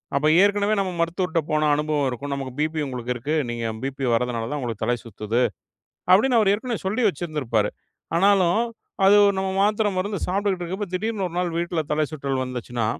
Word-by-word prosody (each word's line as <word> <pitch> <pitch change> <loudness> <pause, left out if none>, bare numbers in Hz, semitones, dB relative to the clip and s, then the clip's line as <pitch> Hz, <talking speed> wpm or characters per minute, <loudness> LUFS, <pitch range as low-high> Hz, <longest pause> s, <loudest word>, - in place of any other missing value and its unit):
அப்ப 150 +2 +2 0.2
ஏற்கனவே 205 +1 +2
நம்ம 190 -2 -1
மருத்துவர்ட்ட 170 0 0
போன 155 0 +2
அனுபவம் 150 -2 0
இருக்கும். 140 +3 -5
நமக்கு 135 -2 -5
பிபி 155 +1 0
உங்களுக்கு 125 -1 -3
இருக்கு. 140 +6 -3 0.2
நீங்க 115 -1 -3 0.2
பிபி 135 0 -3
வர்றதுனால 115 -1 -1
தான் 150 - -2
உங்களுக்குத் 115 -4 -3
தலை 120 +1 +2
சுத்துது 110 +2 -2 0.7
அப்டின்னு 235 +5 +5
அவர் 195 - +3
ஏற்கனவே 230 0 -3
சொல்லி 215 +6 0
வச்சிருந்திருப்பாரு. 140 - -1 0.5
ஆனாலும் 190 0 +4 0.5
அது 200 +2 +7 0.2
நம்ம 190 0 -1
மாத்திர, 210 +1 +2
மருந்து 200 +1 -2
சாப்பிட்டுட்டு 190 -1 0
இருக்கிறப்ப, 190 +4 -4
திடீர்னு 210 +1 -1
ஒரு 170 - -12
நாள் 180 -1 0
வீட்ல 170 -1 -1
தலைசுற்றல் 140 -3 -1
வந்துச்சுன்னா, 125 -2 -4
155 Hz, 165 wpm, -23 LUFS, 130-195 Hz, 0.7 s, அது